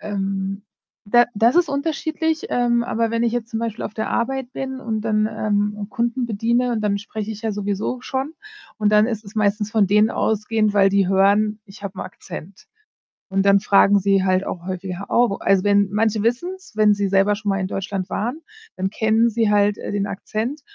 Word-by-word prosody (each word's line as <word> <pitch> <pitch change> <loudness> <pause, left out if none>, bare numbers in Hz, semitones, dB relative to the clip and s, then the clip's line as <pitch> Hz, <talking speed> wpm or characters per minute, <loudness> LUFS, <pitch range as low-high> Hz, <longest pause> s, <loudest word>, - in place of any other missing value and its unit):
Ähm, 195 -1 -3 0.5
da 240 +3 +6
das 230 +6 +3
ist 350 -3 +4
unterschiedlich, 315 +2 -2
ähm, 240 -1 +2
aber 230 -1 -1
wenn 230 0 0
ich 235 - +1
jetzt 240 -1 -3
zum 225 0 -3
Beispiel 230 -2 -4
auf 210 - -6
der 220 - -3
Arbeit 260 +1 -2
bin 265 -1 -5
und 220 -3 -2
dann, 215 -1 +1
ähm, 205 0 -1
Kunden 235 +2 -1
bediene 235 +3 0
und 220 - -1
dann 205 -1 0
spreche 215 +1 -6
ich 215 +1 -7
ja 220 - -1
sowieso 205 +4 -3
schon 270 +4 -4 0.4
und 210 -1 +1
dann 210 +1 +5
ist 225 -3 -4
es 200 - -12
meistens 210 0 +1
von 215 -3 +3
denen 210 +3 +4
ausgehend, 215 0 0
weil 195 -1 +5
die 195 -1 +3
hören, 205 +2 +3
ich 200 -1 -15
habe 195 - -6
'n - - -3
Akzent. 185 0 -10 0.6
Und 195 +1 0
dann 200 0 +6
fragen 200 0 +4
sie 195 0 +2
halt 185 0 +1
auch 175 0 -6
häufiger: 185 +1 -5
„Oh, 240 0 +3
wo“ 200 - -2
also, 195 -1 +2
wenn 200 -1 +3
manche 215 0 +1
wissen 245 +11 0
es, 380 -1 -17
wenn 210 -1 +5
sie 200 -1 -1
selber 195 +2 +3
schon 210 0 -4
mal 195 0 +1
in 190 - -2
Deutschland 195 -1 -4
waren, 245 +9 -3 0.4
dann 190 +1 -1
kennen 220 +3 +2
sie 225 -1 +1
halt, 205 0 +3
äh, - - -6
den 205 0 -1
Akzent 230 +8 -4
210 Hz, 210 wpm, -21 LUFS, 200-235 Hz, 0.6 s, da